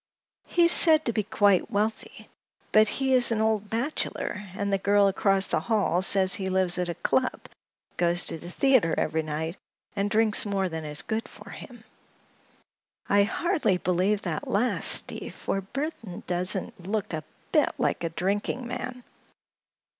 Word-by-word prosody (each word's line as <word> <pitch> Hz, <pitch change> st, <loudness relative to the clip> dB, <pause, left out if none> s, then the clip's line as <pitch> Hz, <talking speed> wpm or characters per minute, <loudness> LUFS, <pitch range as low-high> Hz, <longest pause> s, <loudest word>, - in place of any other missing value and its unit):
"He 345 Hz, -, +2 dB
is 340 Hz, -, +7 dB
said 315 Hz, -3 st, +6 dB
to 235 Hz, -, -1 dB
be 215 Hz, -, 0 dB
quite 205 Hz, -2 st, +1 dB
wealthy. 215 Hz, 0 st, -4 dB, 0.4 s
But 215 Hz, 0 st, +5 dB
he 265 Hz, +5 st, 0 dB
is 250 Hz, -2 st, +4 dB
an 225 Hz, -, 0 dB
old 220 Hz, -2 st, -1 dB
bachelor, 225 Hz, -4 st, -4 dB
and 200 Hz, 0 st, -3 dB
the 195 Hz, -, +1 dB
girl 200 Hz, +1 st, +3 dB
across 195 Hz, 0 st, +2 dB
the -, -, +1 dB
hall 205 Hz, -6 st, 0 dB
says 190 Hz, 0 st, +6 dB
he 190 Hz, -3 st, -1 dB
lives 185 Hz, -1 st, 0 dB
at 180 Hz, -1 st, -2 dB
a 170 Hz, -, -4 dB
club, 255 Hz, -1 st, -1 dB, 0.6 s
goes 175 Hz, 0 st, 0 dB
to 165 Hz, -, -4 dB
the 175 Hz, -, -10 dB
theater 240 Hz, -6 st, +2 dB
every 160 Hz, -, -1 dB
night 160 Hz, +3 st, -5 dB, 0.4 s
and 200 Hz, 0 st, -1 dB
drinks 215 Hz, -1 st, +2 dB
more 195 Hz, -2 st, -2 dB
than 160 Hz, -1 st, -6 dB
is 150 Hz, 0 st, -2 dB
good 220 Hz, 0 st, -4 dB
for -, -, -13 dB
him. -, -, -12 dB, 1.3 s
I 200 Hz, 0 st, +4 dB
hardly 270 Hz, -, 0 dB
believe 185 Hz, +4 st, 0 dB
that 165 Hz, -5 st, -4 dB
last, 230 Hz, +5 st, 0 dB
Steve, -, -, +2 dB
for 195 Hz, -, -3 dB
Mr. 190 Hz, -, -20 dB
Burthon 260 Hz, -, -6 dB
doesn't 185 Hz, +5 st, -1 dB
look 210 Hz, -2 st, -3 dB
a 155 Hz, -1 st, -4 dB, 0.3 s
bit -, -, +3 dB
like -, -, -1 dB
a 165 Hz, -, -1 dB
drinking 200 Hz, +8 st, -3 dB
man." 250 Hz, +1 st, -6 dB
200 Hz, 170 wpm, -26 LUFS, 180-225 Hz, 1.3 s, is